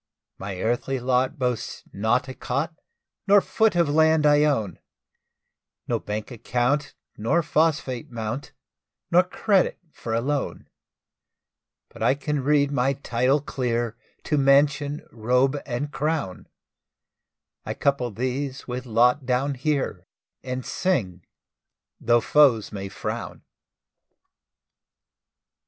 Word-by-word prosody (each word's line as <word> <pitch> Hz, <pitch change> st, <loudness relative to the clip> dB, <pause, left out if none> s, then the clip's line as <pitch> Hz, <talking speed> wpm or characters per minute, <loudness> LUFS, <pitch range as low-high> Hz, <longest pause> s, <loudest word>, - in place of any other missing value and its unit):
My 95 Hz, -1 st, -5 dB
earthly 120 Hz, +4 st, -1 dB
lot 130 Hz, +4 st, +1 dB
boasts 125 Hz, -3 st, -2 dB
not 110 Hz, +5 st, +1 dB
a 130 Hz, -, -6 dB
cot, 140 Hz, +7 st, -2 dB, 0.5 s
No 200 Hz, +1 st, +7 dB
foot 220 Hz, +1 st, +1 dB
of 170 Hz, -2 st, +3 dB
land 160 Hz, +1 st, +3 dB
I 150 Hz, 0 st, +5 dB
own, 110 Hz, -, 0 dB, 1.1 s
No -, -, 0 dB
bank 105 Hz, +3 st, -5 dB
account 125 Hz, +5 st, -1 dB, 0.2 s
nor 140 Hz, +11 st, +1 dB
phosphate 145 Hz, -4 st, 0 dB
mount, 115 Hz, +3 st, -5 dB, 0.6 s
Nor 175 Hz, +1 st, +7 dB
credit 185 Hz, +1 st, +1 dB
for 115 Hz, -5 st, -4 dB
a -, -, +2 dB
loan; 140 Hz, +2 st, -2 dB, 1.2 s
But -, -, -14 dB
I -, -, +3 dB
can 145 Hz, 0 st, -2 dB
read 145 Hz, 0 st, +3 dB
my 135 Hz, 0 st, +1 dB
title 130 Hz, +1 st, +1 dB
clear 120 Hz, -4 st, -2 dB, 0.3 s
To 150 Hz, -, 0 dB
mansion, 140 Hz, +1 st, +3 dB
robe, 125 Hz, +5 st, +1 dB
and 145 Hz, +3 st, -3 dB
crown; 150 Hz, -, -2 dB, 1.2 s
I -, -, -4 dB
couple 140 Hz, -3 st, 0 dB
these 130 Hz, +4 st, -3 dB
with 125 Hz, +1 st, -5 dB
lot 125 Hz, +4 st, +3 dB
down 130 Hz, +3 st, +1 dB
here, 135 Hz, -, -2 dB, 0.3 s
And 125 Hz, 0 st, -5 dB
sing, 100 Hz, -, -1 dB, 0.8 s
tho' 120 Hz, 0 st, +3 dB
foes 130 Hz, -8 st, +4 dB
may 100 Hz, -2 st, -5 dB
frown. -, -, -5 dB
130 Hz, 115 wpm, -24 LUFS, 120-145 Hz, 1.2 s, No